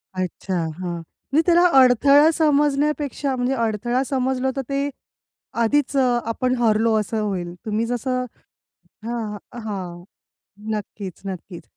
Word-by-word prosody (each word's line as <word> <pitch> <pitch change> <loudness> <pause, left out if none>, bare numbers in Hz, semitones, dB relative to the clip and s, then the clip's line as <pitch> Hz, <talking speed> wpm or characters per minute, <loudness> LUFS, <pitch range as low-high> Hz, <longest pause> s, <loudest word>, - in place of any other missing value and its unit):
अच्छा 185 +1 -3 0.2
हां, 175 -2 -3 0.4
म्हणजे 305 - +4
त्याला 345 0 +5 0.2
अडथळा 275 +5 +6
समजण्यापेक्षा 290 -2 +1
म्हणजे 250 +1 0
अडथळा 235 +1 0
समजलं 265 0 0
तर 270 - +1
ते 280 +1 0 0.7
आधीच 280 +4 +1
अ, 250 -2 +3
आपण 255 +2 0
हरलो 225 -1 +2
असं 215 +1 -2
होईल. 185 -4 -3
तुम्ही 220 +1 0
जसं 250 +1 -1 0.8
हां, 225 -3 -3 0.3
हां. 180 -5 -5 0.7
नक्कीच, 205 -3 -6
नक्कीच. 185 -2 -7
240 Hz, 115 wpm, -22 LUFS, 210-275 Hz, 0.8 s, अडथळा